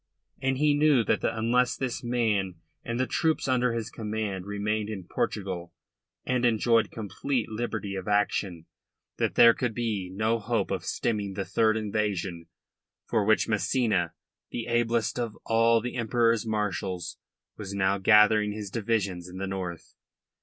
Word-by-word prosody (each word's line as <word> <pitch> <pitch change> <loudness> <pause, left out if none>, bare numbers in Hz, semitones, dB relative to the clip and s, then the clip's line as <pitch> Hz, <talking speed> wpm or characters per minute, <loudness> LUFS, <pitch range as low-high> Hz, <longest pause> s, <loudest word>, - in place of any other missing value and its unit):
And 135 -1 0
he 150 +1 +3
knew 145 -4 +4
that - - 0
unless 120 +3 +1
this 130 -2 -3
man 110 -6 0 0.3
and 115 +1 -3
the 130 - +2
troops 160 +2 0
under 125 -2 +2
his 115 -2 -3
command 105 -4 -4
remained 105 +1 -2
in 100 -4 -5
Portugal 90 -1 -3 0.5
and 125 -1 0
enjoyed 115 -1 +3
complete 115 +3 -3
liberty 110 -2 -3
of 95 0 -5
action 100 -4 0 0.5
there 115 0 +6
could 120 -3 -2
be 110 -6 -2
no 110 +4 0
hope 100 - -1
of - - -2
stemming 105 -4 -1
the 100 -1 -2
third 110 -1 +2
invasion 100 -5 -2 0.6
for 110 -3 +1
which 110 +1 +3
Massena 105 -5 +1 0.3
the 115 - -4
ablest 120 0 0
of 115 -3 -3
all 115 0 +4
the 125 +2 -5
Emperor's 115 -1 +1
marshals 95 -4 -2 0.4
was 100 -1 -6
now 100 0 +1
gathering 105 +1 +5
his 105 -2 -6
divisions 100 -6 -1
in 90 - -9
the 95 - -3
north. 95 -3 -5
110 Hz, 145 wpm, -27 LUFS, 100-115 Hz, 0.6 s, there